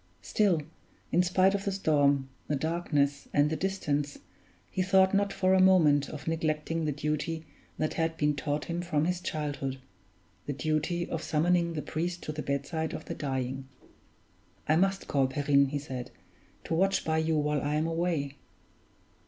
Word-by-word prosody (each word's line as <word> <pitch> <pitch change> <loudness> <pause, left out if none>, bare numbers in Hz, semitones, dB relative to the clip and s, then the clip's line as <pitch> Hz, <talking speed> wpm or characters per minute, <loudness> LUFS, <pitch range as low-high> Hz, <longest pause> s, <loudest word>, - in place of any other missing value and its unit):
Still, 185 - +2 0.5
in 175 - +4
spite 185 +2 +3
of 200 0 -1
the 200 - -1
storm, 145 -7 +2 0.2
the 150 - 0
darkness, 145 -2 0
and 145 +1 +4
the - - +1
distance, 150 -6 -1 0.5
he 185 - -1
thought 190 +1 +4
not 200 0 +2
for 185 -1 +2
a 190 - +5
moment 160 -7 +5
of 150 0 -8
neglecting 160 0 -1
the 150 - +1
duty 150 +3 -2 0.3
that 155 - -1
had 160 0 -1
been 150 -1 +2
taught 145 +1 -2
him 170 0 -3
from 155 -3 0
his 180 0 -1
childhood 145 -5 -3 0.7
the 145 - -1
duty 155 +4 -1
of 165 - -3
summoning 170 +2 +1
the 150 - -3
priest 175 +3 -3
to - - -3
the 150 0 -4
bedside 150 +4 -2
of - - -7
the - - -4
dying. 130 -1 -3 1.0
"I 155 - +4
must 195 +3 +1
call 135 -2 +2
Perrine," 140 +1 +3
he 145 +2 -2
said, 130 -3 -6 0.5
"to - - -3
watch 195 +4 +2
by 160 0 +1
you 160 0 +1
while 150 -1 +1
I 145 +1 -1
am 155 +1 +1
away." 165 -4 -1
155 Hz, 170 wpm, -29 LUFS, 145-175 Hz, 1.0 s, a